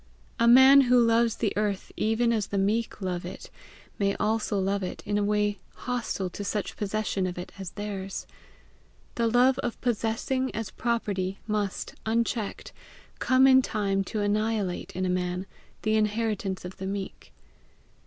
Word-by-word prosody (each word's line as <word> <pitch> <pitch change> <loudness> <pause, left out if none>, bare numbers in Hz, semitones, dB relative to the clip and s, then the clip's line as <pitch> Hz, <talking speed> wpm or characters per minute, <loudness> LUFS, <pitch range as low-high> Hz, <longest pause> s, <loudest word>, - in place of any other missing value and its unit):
A 235 - +4
man 265 +3 +9
who 250 -1 +4
loves 230 -1 +3
the 215 - -1
earth 205 -2 -1
even 230 +2 +1
as 215 -3 0
the 200 - -3
meek 210 +3 0
love 180 -2 -2
it, 180 - -8 0.5
may 200 -1 +1
also 215 -1 0
love 195 +1 0
it 185 - -5
in 205 -1 -1
a - - +1
way 210 0 +1 0.2
hostile 240 -6 -3
to 205 - -6
such 200 0 -3
possession 205 -2 -1
of 180 - -5
it 180 - -6
as 190 - -6
is - - -5
theirs. 200 -2 -5 0.9
The 235 -1 +1
love 250 +3 +4
of 240 - -3
possessing 240 +3 -1
as 220 -3 -4
property, 200 -5 -1
must, 210 -2 -2
unchecked, 225 -1 -2 0.5
come 260 +1 +4
in 260 -1 +7
time 200 -5 0
to 215 +2 -3
annihilate 205 -2 -1
in 185 +1 -1
a - - 0
man 180 0 -1 0.4
the 215 0 +2
inheritance 210 -3 -1
of 180 - -8
the 190 - -5
meek. 195 0 -6
210 Hz, 165 wpm, -27 LUFS, 195-230 Hz, 0.9 s, man